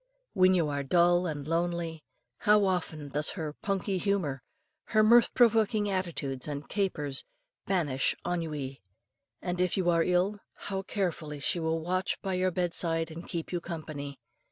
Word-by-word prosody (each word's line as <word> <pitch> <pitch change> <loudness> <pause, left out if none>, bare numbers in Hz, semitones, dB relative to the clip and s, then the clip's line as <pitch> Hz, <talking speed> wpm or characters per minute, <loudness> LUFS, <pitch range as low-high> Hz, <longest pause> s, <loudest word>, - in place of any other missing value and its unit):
When 185 -1 +5
you 170 -4 +2
are 145 -1 -1
dull 175 +4 +3
and 145 -3 -4
lonely, 165 -1 -1 0.4
how 210 -2 +4
often 165 -6 -2
does 150 +2 +2
her 155 -3 -3
"punky 195 -1 -1
humour," 175 -10 0 0.4
her 215 -1 +3
mirth 235 +2 +6
provoking 220 -3 +3
attitudes 155 -9 -2
and 145 0 -5
capers 155 -9 -2 0.4
banish 150 -9 +1
ennui. 150 -6 -3 0.6
And 180 0 -1
if 180 +1 +1
you 175 -2 +3
are 165 -1 +3
ill, 180 +4 +1 0.2
how 195 -1 -4
carefully 170 -7 -3
she 170 +5 0
will 160 0 0
watch 185 +3 -1
by 190 - -1
your 185 0 +2
bedside 165 -2 0
and 165 +2 -8
keep 165 -2 -4
you 175 -1 -2
company. 155 -5 -6
175 Hz, 155 wpm, -29 LUFS, 155-190 Hz, 0.6 s, mirth